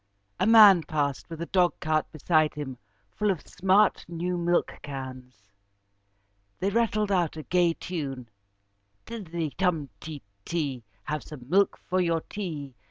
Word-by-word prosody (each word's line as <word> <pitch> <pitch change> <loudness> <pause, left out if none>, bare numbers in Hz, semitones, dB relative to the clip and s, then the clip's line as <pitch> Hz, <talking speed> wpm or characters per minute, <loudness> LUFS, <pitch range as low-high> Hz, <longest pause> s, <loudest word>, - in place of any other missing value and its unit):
A - - +2
man 210 -5 +9
passed, 145 -2 -2
with 165 0 -5
a - - -4
dogcart 170 -4 +1
beside 155 0 +2
him 135 -4 -6 0.3
full 210 - 0
of 185 -6 -1
smart, 195 +3 +3
new 175 +1 -2
milkcans. 130 - -3 1.1
They 195 +2 0
rattled 215 -2 +1
out 175 -4 +1
a 155 - -6
gay 175 0 +2
tune: 140 -8 -5 0.8
"Tiddity 170 -9 -4
tum 165 -6 0
ti 155 -3 -8 0.2
ti. 140 -7 -2 0.2
Have 150 +4 -3
some 130 -5 -11
milk 195 +6 +3
for 185 0 -1
your 165 -2 +1
tea. 155 -11 -6
165 Hz, 135 wpm, -27 LUFS, 145-185 Hz, 1.1 s, man